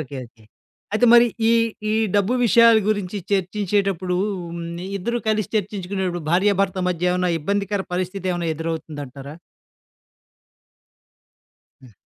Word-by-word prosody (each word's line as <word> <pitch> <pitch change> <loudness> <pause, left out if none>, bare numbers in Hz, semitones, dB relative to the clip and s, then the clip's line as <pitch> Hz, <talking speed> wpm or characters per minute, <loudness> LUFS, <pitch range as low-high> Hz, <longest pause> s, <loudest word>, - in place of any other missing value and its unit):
Okay, 140 -2 -7
okay. 115 -2 -24 0.5
అయితే 245 +3 +3
మరి 240 0 +7 0.2
ఈ - - +5 0.4
ఈ - - +1 0.2
డబ్బు 205 +5 +2
విషయాల 230 0 +6
గురించి 205 -2 -1 0.2
చర్చించేటప్పుడు 195 -1 0 0.4
హ్మ్. 170 0 -5 0.4
ఇద్దరు 235 +6 -2
కలిసి 215 -2 0
చర్చించుకునేటప్పుడు 190 -4 -3
భార్య, 200 +3 +3
భర్త 190 -1 -2
మధ్య 180 0 0
ఏమైనా 180 -1 0
ఇబ్బందికర 200 +3 -1
పరిస్థితేమన్నా 180 -2 -2
ఎదురవుతుందంటారా? 150 -3 -6 2.5
హ్మ్. 125 -4 -16
185 Hz, 110 wpm, -22 LUFS, 170-205 Hz, 2.5 s, మరి